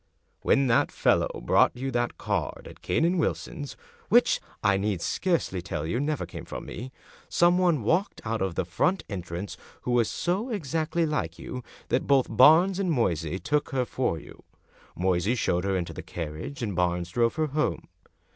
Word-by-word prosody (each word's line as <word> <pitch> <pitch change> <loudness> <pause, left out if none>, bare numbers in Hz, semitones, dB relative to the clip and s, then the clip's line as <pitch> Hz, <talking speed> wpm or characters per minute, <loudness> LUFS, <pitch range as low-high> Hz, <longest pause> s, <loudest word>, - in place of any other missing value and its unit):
When 135 - +3
that 115 -2 +3
fellow - - +1
brought - - +4
you 135 +2 -3
that 120 -1 -1
card - - -2
at - - -13
Cane 160 - +1
and 175 +1 +2
Wilson's 145 -3 -3 0.2
— - - -29
which, - - +5 0.2
I 100 - +4
need 100 -1 0
scarcely 165 - 0
tell 85 -5 -4
you, 100 +10 -1
never 150 +1 -1
came - - -8
from - - -7
me 125 +4 -7 0.2
— - - -24
some 175 +1 +4
one 170 -9 +2
walked 175 - +1
out 110 -1 -1
of 95 -3 -1
the 90 - 0
front 180 - +1
entrance 90 -1 -5 0.3
who 125 - -2
was 120 -2 +3
so 190 +8 -1
exactly 165 - -1
like 100 - -2
you 125 0 -6 0.3
that 125 - +1
both 135 -5 +3
Barnes 165 - +6
and 185 -3 +1
Moysey 90 - 0
took 145 +8 0
her 130 -2 0
for 125 -9 -1
you. - - -14 0.5
Moysey 90 +5 +1
showed 90 -6 0
her 95 -1 +1
into 85 -2 -3
the - - -6
carriage, 80 - -6
and 100 -5 -2
Barnes 90 0 0
drove 115 +1 +2
her 155 0 +1
home. 150 0 -1
120 Hz, 185 wpm, -27 LUFS, -, 0.5 s, Barnes